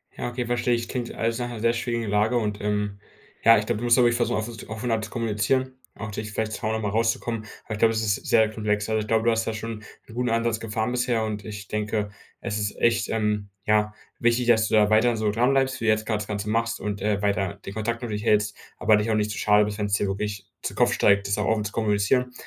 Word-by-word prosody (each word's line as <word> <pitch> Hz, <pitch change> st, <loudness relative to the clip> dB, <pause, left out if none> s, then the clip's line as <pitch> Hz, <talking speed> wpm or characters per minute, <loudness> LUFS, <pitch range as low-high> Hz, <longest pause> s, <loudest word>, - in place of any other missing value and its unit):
Ja, -, -, -3 dB
okay, 120 Hz, 0 st, -3 dB
verstehe 120 Hz, 0 st, +1 dB
ich, 115 Hz, 0 st, -2 dB
klingt 125 Hz, -3 st, -3 dB
alles 115 Hz, +1 st, -1 dB
nach 120 Hz, 0 st, -2 dB
'ner 115 Hz, -2 st, -6 dB
sehr 115 Hz, +1 st, +2 dB
schwierigen 115 Hz, -2 st, -2 dB
Lage 105 Hz, +4 st, +2 dB
und, 105 Hz, -2 st, -1 dB
ähm, 105 Hz, -1 st, -1 dB, 0.4 s
ja, 115 Hz, 0 st, +8 dB
ich 105 Hz, -, -1 dB
glaube 115 Hz, -1 st, -1 dB
du 120 Hz, -, -6 dB
musst 120 Hz, +1 st, +5 dB
auch -, -, +6 dB
wirklich 120 Hz, 0 st, +4 dB
versuchen 120 Hz, -1 st, +1 dB
offen 110 Hz, 0 st, -5 dB
offener 110 Hz, +1 st, -2 dB
zu -, -, -6 dB
kommunizieren, 120 Hz, +3 st, 0 dB, 0.2 s
auch 110 Hz, +1 st, -6 dB
dich 110 Hz, +1 st, -5 dB
vielleicht 110 Hz, 0 st, -2 dB
zu -, -, -5 dB
Hause 110 Hz, 0 st, 0 dB
mal 105 Hz, -2 st, -1 dB
rauszukommen. 115 Hz, +1 st, -1 dB, 0.2 s
Aber 110 Hz, -, -5 dB
ich 105 Hz, -, -5 dB
glaube, 115 Hz, 0 st, +4 dB
das 110 Hz, -, 0 dB
ist 105 Hz, -2 st, 0 dB
sehr 110 Hz, -2 st, +4 dB
komplex. 105 Hz, -1 st, -1 dB
Also, 110 Hz, 0 st, +1 dB
ich 105 Hz, -, -6 dB
glaube, 115 Hz, 0 st, +2 dB
du 115 Hz, -, +5 dB
hast 115 Hz, 0 st, 0 dB
da 115 Hz, -, -2 dB
schon 110 Hz, 0 st, -5 dB, 0.3 s
'n -, -, -13 dB
guten 125 Hz, 0 st, 0 dB
Ansatz 115 Hz, 0 st, 0 dB
gefahren 110 Hz, +1 st, -2 dB
bisher. 125 Hz, -2 st, 0 dB
Und 105 Hz, -2 st, -4 dB
ich 105 Hz, -2 st, -7 dB
denke, 105 Hz, -1 st, -2 dB, 0.3 s
es 105 Hz, -, -2 dB
ist 105 Hz, 0 st, -2 dB
echt, 120 Hz, 0 st, +2 dB
ähm, 105 Hz, -2 st, -1 dB, 0.2 s
ja, 105 Hz, 0 st, +2 dB, 0.3 s
wichtig, 120 Hz, +1 st, +2 dB
dass 110 Hz, -2 st, +4 dB
du -, -, +1 dB
da 105 Hz, -1 st, +5 dB
weiterhin 110 Hz, +2 st, +3 dB
so 110 Hz, -1 st, +1 dB
dranbleibst, 130 Hz, +4 st, +2 dB
wie -, -, -2 dB
du 110 Hz, -, +5 dB
jetzt 110 Hz, 0 st, 0 dB
grad 105 Hz, -1 st, -1 dB
das 105 Hz, -, -6 dB
Ganze 105 Hz, 0 st, -3 dB
machst 115 Hz, +1 st, 0 dB
und, 100 Hz, 0 st, -4 dB
äh, 105 Hz, -1 st, 0 dB
weiter 100 Hz, -1 st, 0 dB
den 95 Hz, -, -6 dB
Kontakt 115 Hz, +2 st, -2 dB
nur 120 Hz, -, -4 dB
durchhältst, 105 Hz, -1 st, +1 dB, 0.2 s
aber 110 Hz, 0 st, +4 dB
dich 110 Hz, +2 st, 0 dB
auch -, -, +2 dB
nicht 105 Hz, 0 st, 0 dB
zu -, -, -5 dB
schade 105 Hz, 0 st, +4 dB
bist, 105 Hz, -1 st, -4 dB
wenn's 105 Hz, -2 st, -2 dB
dir 100 Hz, -, +2 dB
wirklich 100 Hz, 0 st, -4 dB, 0.2 s
zu -, -, -3 dB
Kopf -, -, +3 dB
steigt, 100 Hz, 0 st, +3 dB
das 100 Hz, -, 0 dB
auch 105 Hz, -, 0 dB
offen 110 Hz, -1 st, +1 dB
zu 105 Hz, -, -2 dB
kommunizieren. 110 Hz, +4 st, +1 dB
110 Hz, 260 wpm, -25 LUFS, 105-115 Hz, 0.4 s, ja